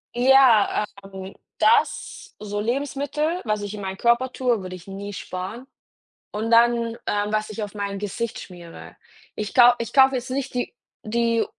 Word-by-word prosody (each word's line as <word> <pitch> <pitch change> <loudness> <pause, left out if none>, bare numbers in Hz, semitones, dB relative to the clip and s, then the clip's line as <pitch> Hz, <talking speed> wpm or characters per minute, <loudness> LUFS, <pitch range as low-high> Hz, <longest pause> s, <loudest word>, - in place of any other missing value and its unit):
Ja, 250 -5 +5 0.2
ähm, 190 0 -9 0.2
das - - +1
so 205 -1 -4
Lebensmittel, 285 - -2
was 215 -1 -1
ich 205 0 -5
in 210 - -7
meinem 190 -1 -5
Körper 240 +3 +2
tue, 245 -5 0
würde 185 0 -7
ich 180 0 -14
nie 200 +1 -7
sparen. 190 +8 -6 0.6
Und 220 +2 -3
dann, 235 0 +3
ähm, 205 0 0
was 215 0 -1
ich 215 0 -5
auf 205 - -7
mein 200 -1 -4
Gesicht 220 +3 -4
schmiere. 170 - -11 0.4
Ich 210 -1 -5
kau 245 -1 +8
ich 230 -2 -5
kaufe 265 -1 +6
jetzt 250 +1 -4
nicht 270 0 -3
die 245 0 -3 0.3
die 230 +1 +1
220 Hz, 165 wpm, -23 LUFS, 200-245 Hz, 0.6 s, kau